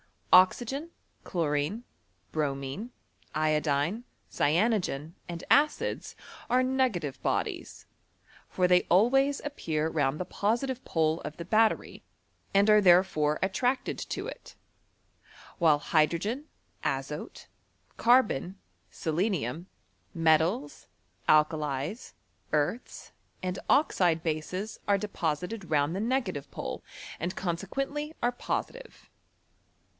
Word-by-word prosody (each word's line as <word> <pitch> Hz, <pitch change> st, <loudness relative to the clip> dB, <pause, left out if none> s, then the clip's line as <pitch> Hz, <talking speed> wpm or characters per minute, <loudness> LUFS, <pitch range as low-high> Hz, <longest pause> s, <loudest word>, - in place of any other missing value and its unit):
Oxygen, 250 Hz, -, +4 dB, 0.3 s
chlorine, 160 Hz, +5 st, -1 dB, 0.5 s
bromine, 140 Hz, -, -3 dB, 0.5 s
iodine, 155 Hz, +6 st, +1 dB, 0.3 s
cyanogen, 170 Hz, -3 st, +1 dB
and 170 Hz, -1 st, -6 dB
acids, 295 Hz, +1 st, +2 dB, 0.3 s
are 250 Hz, +2 st, +3 dB
negative 245 Hz, -, 0 dB
bodies; -, -, -2 dB, 0.6 s
for 180 Hz, -, 0 dB
they 180 Hz, 0 st, +5 dB
always 270 Hz, +9 st, +3 dB
appear 160 Hz, -, -2 dB
round 145 Hz, -2 st, 0 dB
the 180 Hz, -, -2 dB
posid'f 235 Hz, +8 st, -1 dB
e -, -, -29 dB
pole 160 Hz, 0 st, +1 dB
of 150 Hz, -, -6 dB
the 170 Hz, -, -5 dB
battery, 220 Hz, +4 st, +1 dB, 0.5 s
and 200 Hz, +1 st, +4 dB
are 210 Hz, 0 st, +7 dB
therefore 175 Hz, -5 st, +4 dB
at 190 Hz, 0 st, 0 dB
tracted 255 Hz, +1 st, 0 dB
to -, -, -4 dB
it: -, -, -9 dB, 1.0 s
while 160 Hz, -4 st, +5 dB
hydrogen, 170 Hz, -, +1 dB, 0.4 s
azote, -, -, -4 dB, 0.5 s
carbon, 215 Hz, -, +3 dB, 0.3 s
sele 160 Hz, -3 st, -4 dB
nium, 175 Hz, -, -1 dB, 0.5 s
metals, 160 Hz, +1 st, +1 dB, 0.4 s
alkalies, 155 Hz, -, +1 dB, 0.4 s
earths, 150 Hz, +11 st, -2 dB, 0.3 s
and 185 Hz, 0 st, -2 dB
oxide 175 Hz, -, +3 dB
bases, 175 Hz, +6 st, -3 dB
are 200 Hz, -1 st, +4 dB
deposited 180 Hz, 0 st, -3 dB
round 150 Hz, 0 st, +2 dB
the -, -, -2 dB
negative 235 Hz, -, -1 dB
pole, -, -, -5 dB, 0.4 s
and 175 Hz, +3 st, -3 dB
conseqoendy 275 Hz, -, -3 dB
oie 240 Hz, 0 st, +1 dB
positive. -, -, -5 dB
180 Hz, 100 wpm, -29 LUFS, 155-230 Hz, 1.0 s, are